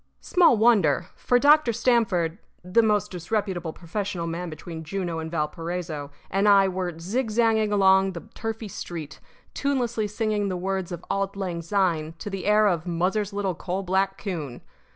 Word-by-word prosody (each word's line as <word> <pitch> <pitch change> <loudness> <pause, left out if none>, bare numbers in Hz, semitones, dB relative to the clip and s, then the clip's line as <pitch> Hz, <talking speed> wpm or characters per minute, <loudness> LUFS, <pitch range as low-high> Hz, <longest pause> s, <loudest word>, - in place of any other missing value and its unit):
Small 340 -10 +4
wonder: 210 -10 +4
for 245 - +2
Dr. 290 -1 +5
Stamford 220 -7 +1 0.2
(the 180 +6 +3
most 210 -2 +1
disreputable 180 -2 -2
professional 180 +1 -4
man 170 +1 -4
between 160 +1 -8
Juneau 175 0 -3
and 160 0 -5
Valparaiso) 165 -1 -3 0.2
and 195 +2 +3
I 195 -1 +6
were 180 -3 -3
zigzagging 220 +3 +1
along 190 -1 +4
the 170 - -6
turfy 225 0 -4
street, 165 -5 -7 0.3
tunelessly 245 -6 0
singing 210 -1 -1
the 185 - -2
words 190 0 -2
of 175 0 -6
"Auld 195 0 -1
Lang 180 -4 -3
Syne" 170 -4 0
to 205 - -6
the 195 0 -4
air 210 +1 +5
of 175 -5 +1
"Muzzer's 190 +5 0
Little 200 -2 -1
Coal 185 +3 -4
Black 195 +1 0
Coon." 160 - -5
195 Hz, 155 wpm, -25 LUFS, 170-210 Hz, 0.3 s, I